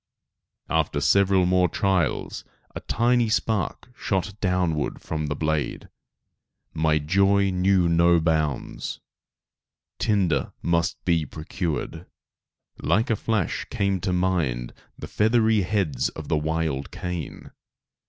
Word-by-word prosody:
After 80 -2 0
several 95 +3 +3
more 90 0 +3
trials, 95 0 -1 0.3
a - - -5
tiny 120 0 +1
spark 110 +1 -1
shot 95 -1 -2
downward 90 -6 0
from 75 -1 -4
the 75 - -2
blade. 75 -1 -2 0.8
My 80 -1 +2
joy 100 +5 +2
knew 90 -1 +2
no 85 +1 +4
bounds. 80 -4 -1 1.0
Tinder 90 - +1
must 85 0 0
be 85 -3 +2
procured. 80 +2 -4 0.7
Like 115 +3 +1
a - - +3
flash 105 -4 -1
came 100 -1 0
to 95 +1 -2
my 90 -2 +1
mind - - -5 0.2
the - - -7
feathery 110 0 +2
heads 90 - 0
of 80 -2 -9
the - - +2
wild 80 -3 -2
cane. 90 -4 -6
90 Hz, 115 wpm, -24 LUFS, 80-100 Hz, 1.0 s, no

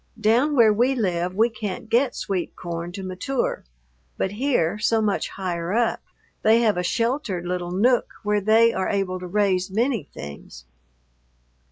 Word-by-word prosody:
Down 240 +7 +3
where 225 -4 +6
we 245 +5 +2
live 180 -5 -1
we 225 +3 +4
can't 215 -2 -6
get 245 +3 +2
sweet 190 -4 -3
corn 170 0 -5
to 195 0 -6
mature, 185 +8 -2 0.5
but 190 - -1
here, 210 - 0
so 225 +1 +2
much 210 -2 0
higher 175 -2 -3
up, 235 0 +1 0.4
they 225 +2 +4
have 220 -3 +3
a 180 - 0
sheltered 230 - -1
little 175 0 -3
nook 230 +7 +2
where 210 0 +1
they 225 +3 +4
are 190 - -1
able 190 -2 -1
to 180 - -7
raise 190 -1 +1
many 230 +3 0
things. 70 -3 -10
205 Hz, 160 wpm, -23 LUFS, 180-230 Hz, 0.5 s, where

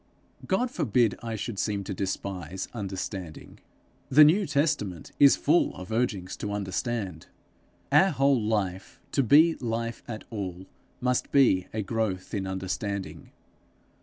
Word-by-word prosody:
God 240 +6 +1
forbid 120 - +2
I 115 -1 -4
should 110 -1 -4
seem 100 -2 -1
to 100 - -5
despise 95 -2 -4
understanding. 95 -5 -6 0.5
The 150 +3 +8
New 180 +6 +4
Testament 140 - -1
is 140 -1 +8
full 160 +4 +2
of 90 +3 -9
urgings 100 -5 -1
to 105 -1 -4
understand. 100 -3 -3 0.6
Our 190 - +6
whole 135 -5 +2
life, 100 -3 -2
to 140 - +2
be 155 +7 +5
life 115 -1 -3
at 110 -2 -6
all, 95 -4 -5 0.4
must 125 0 0
be 120 -10 +4
a 110 -1 -2
growth 100 -3 -2
in 95 -3 -2
understanding. 95 +1 -4
105 Hz, 135 wpm, -27 LUFS, 95-125 Hz, 0.6 s, The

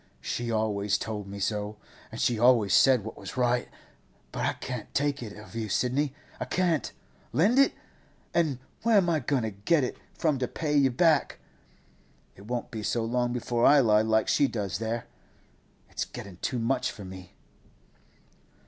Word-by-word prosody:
'She 120 -1 -3
always 105 -2 0
told 105 -3 -5
me 100 +1 -7
so, 105 +1 -2 0.3
and 115 - -7
she 120 -3 +1
always 115 -5 +4
said 130 -2 +5
what 110 - -7
was - - -8
right. 125 -1 +1 0.6
But - - -1
I - - +1
can't 125 -4 -6
take 145 -1 0
it 110 -3 -7
of 105 -3 -12
you, 110 -2 -3
Sidney; 135 +6 0 0.2
I - - -2
can't! 170 -8 0 0.4
Lend 210 - +3
it? 275 - +5 0.6
An' 160 -6 +1 0.2
where 230 -2 +4
am 175 -3 +3
I 160 - +2
goin' 130 -1 0
to 110 - -2
get 130 +10 +1
it 125 - -3 0.2
from 155 -6 +1
to 125 - 0
pay 150 +2 -2
you 140 -2 +5
back? 150 +2 +2 1.0
It 100 +2 -14
won't 120 0 -3
be 110 - -5
so 115 +2 -1
long 120 +1 0
before 120 -1 -1
I 145 +2 +7
lie 105 -4 +4
like 110 0 +2
she 140 - +3
does 100 -5 -3
there. 115 +1 -3 0.8
It's - - -3
getting 95 -3 -9
too 125 - -2
much 125 +3 0
for 100 - -10
me. 95 -1 -11
120 Hz, 175 wpm, -28 LUFS, 105-140 Hz, 1.0 s, I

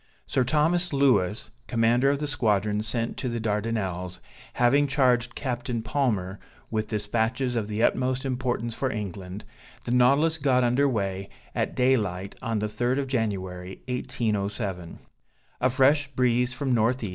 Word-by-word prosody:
Sir 130 - +1
Thomas 160 +7 +2
Louis, 120 -7 +2 0.2
commander 120 +3 +3
of 140 - +2
the 150 - -3
squadron 105 -7 +1
sent 115 +1 -2
to 130 - -2
the 115 0 -2
Dardanelles, 105 -5 -2 0.3
having 140 +4 +3
charged 125 -3 +2
Captain 120 -3 -3
Palmer 105 -8 -1 0.3
with 110 -1 -1
dispatches 115 +4 -1
of 110 -3 -1
the 105 +1 -1
utmost 130 +2 +1
importance 125 -3 -1
for 130 +3 -1
England, 100 -2 -6 0.4
the - - -4
Nautilus 140 +6 +4
got 130 -3 +3
under 125 +4 +3
weigh 100 -4 -2 0.2
at - - -1
daylight 105 -7 +1
on 115 -1 -1
the 105 0 -1
third 120 +5 -1
of 140 - 0
January 95 -7 -3
1807. 105 -7 -2 0.6
A 130 - +4
fresh 135 +3 +3
breeze 125 -2 +1
from 125 +1 0
N. 115 +2 +3
E. 110 - -4
120 Hz, 145 wpm, -26 LUFS, 105-130 Hz, 0.6 s, Nautilus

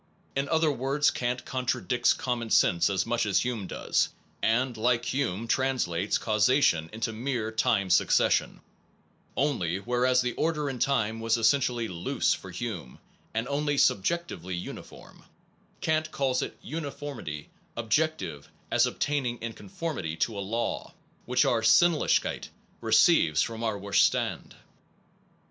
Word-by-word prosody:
In 140 +1 -1
other 160 -1 +3
words 140 +2 +1
Kant 125 0 -2
contradicts 125 -1 +1
common 120 -3 -3
sense 85 -2 +4
as 95 -1 0
much 115 -1 0
as 100 - +2
Hume 120 -6 -3
does - - 0 0.3
and, 120 +2 +1
like 120 +1 +1
Hume, 115 -5 -2
translates 115 -9 0
caus 110 +1 +2
ation 85 - +3
into 115 +1 -3
mere 115 -1 -2
time 100 -3 +1
succession; 95 - +2 0.8
only, 105 - 0
whereas 125 +4 +2
the 125 -1 -1
order 150 -3 -1
in 125 - -7
time 115 -5 +1
was 115 +1 +1
essentially 120 -1 +2
loose 85 -3 0
for 95 - -8
Hume 90 - -6 0.4
and 115 +2 -1
only 145 +1 0
subjectively 95 - 0
uniform, 90 - -9 0.6
Kant 155 0 0
calls 130 -2 0
its - - -5
uniformity 140 - -6
* - - -37
objective 115 - -1 0.2
as - - +4
obtaining 135 -5 -1
in 115 0 -5
conformity 100 - -5
to 110 +6 -1
a 100 - -3
law, 115 +4 -3 0.3
which 125 +1 +3
our 115 - +2
Sinnlichkeit 165 +8 +3 0.3
receives 75 -1 +4
from 115 0 -5
our 110 -3 -1
Ver 100 0 -8
stand. - - +1
120 Hz, 135 wpm, -28 LUFS, 105-135 Hz, 0.8 s, sense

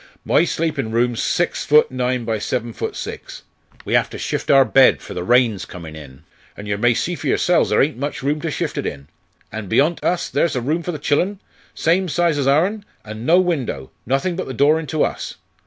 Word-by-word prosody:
"My 170 - +3
sleepin' 155 -9 -2
room's 120 +1 0
six 175 - 0
foot 150 -1 +4
nine 125 -1 -1
by 110 -1 -1
seven 115 +2 -3
foot - - -4
six. - - -7 0.4
We - - -3
have - - +3
to - - -8
shift - - -3
our 135 -1 +6
bed 135 0 +5
for - - -9
the 90 - -4
rain's 120 -2 +3
comin' 80 -3 -9
in, 70 -4 -12 0.3
an' 105 - -8
yer 100 -1 -2
may 120 +2 +3
see 175 - -1
for - - -5
yoursels 175 -1 +2
ther - - +4
ain't 150 0 -2
much 140 -1 -4
room 150 +2 0
to 165 - -2
shift - - -3
it - - -2
in. 70 -1 -7 0.4
An' 110 -1 -6
beyont 155 - +1
us 180 -1 0
ther's 170 - 0
a - - +1
room 155 +7 -1
for 175 - -4
the 155 - -5
chillen, 175 +7 0 0.4
same 180 +3 +1
size 170 -2 +1
as 135 - 0
ourn, 180 +10 +2 0.2
an' 110 +2 -7
no 175 +3 +6
window, 135 - -2 0.2
nothin' 135 +8 0
but 185 - -4
the 130 - -6
door 150 +5 +4
into 155 -1 -1
us. - - -3
140 Hz, 220 wpm, -20 LUFS, 115-165 Hz, 0.4 s, our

